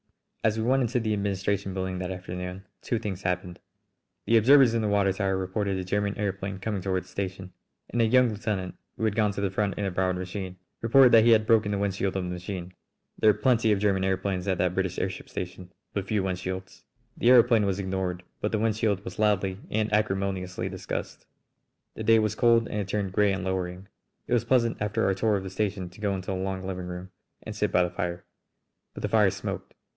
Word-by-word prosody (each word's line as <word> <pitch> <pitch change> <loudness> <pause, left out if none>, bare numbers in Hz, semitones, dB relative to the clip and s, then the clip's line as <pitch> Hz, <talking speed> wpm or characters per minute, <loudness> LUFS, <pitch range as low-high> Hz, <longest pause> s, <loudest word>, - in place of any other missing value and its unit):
As 110 0 +2
we 110 - -1
went 130 +3 +3
into 125 +1 +1
the 110 -2 -1
administration 100 -1 -1
building 95 -1 -3
that 90 -1 -3
afternoon 90 +1 -6 0.2
two 120 - -1
things 100 -4 -4
happened: 90 -1 -2 0.7
The 115 - +3
observers 130 +1 +6
in 115 - +1
the 110 - 0
water 100 -2 +2
tower 95 -1 0
reported 95 +1 -1
a 95 - -3
German 100 +2 -1
aëroplane 100 -2 -3
coming 100 -1 -3
toward 95 -1 -1
the - - -22
station, 95 -1 -5 0.4
and 120 - +1
a - - +5
young 125 +1 +5
lieutenant, 100 -3 -3 0.2
who - - -4
had 105 -2 0
gone 105 -2 +2
to 100 - -4
the 100 -2 0
front 100 +1 0
in 100 - -1
a 95 - -1
borrowed 95 0 0
machine, 95 0 -5 0.2
reported 125 +2 +6
that 115 -1 +7
he - - +6
had 110 -2 +5
broken 110 -2 +3
the 100 - 0
wind 100 -1 0
shield 95 0 -2
of 95 - -1
the 90 - -4
machine. 90 0 -6 0.5
There 110 - +5
are - - +6
plenty 115 -1 +2
of 105 - +3
German 100 -1 +1
aëroplanes 95 0 -1
at 95 -2 +1
that 90 0 +1
British 95 -1 -1
airship 95 -1 -3
station, 90 0 -6 0.2
but 100 -1 -3
few 105 -2 0
wind 95 -2 -2
shields. 95 0 -6 0.3
The - - -1
aëroplane 120 -4 +6
was 95 -1 0
ignored, 95 -2 -3 0.2
but 105 - -1
the 110 - +1
wind 110 0 +1
shield 105 -3 0
was - - -7
loudly 100 -3 +1
and 110 0 -1
acrimoniously 95 -3 -1
discussed. - - -5 0.7
The - - -8
day 115 +1 +5
was 110 -2 +1
cold 115 0 +4
and 105 - -3
had 100 - -3
turned 100 -2 -2
grey 105 0 +3
and 95 -1 -2
lowering. 95 0 -3 0.4
It - - -2
was 120 -1 +2
pleasant 115 -3 +2
after 105 +2 0
our 95 - +3
tour 105 +2 +1
of 95 - -2
the 95 - -6
station 95 -2 -2
to 100 - -15
go 100 -2 0
into 95 0 -4
the - - -1
long 95 0 -3
living 90 -1 -4
room 90 +1 -7 0.3
and - - -7
sit - - 0
by 90 - +4
the 90 - -2
fire. 90 0 -4 0.7
But - - -7
the - - +1
fire - - +4
smoked. - - -6
100 Hz, 230 wpm, -27 LUFS, 95-110 Hz, 0.7 s, that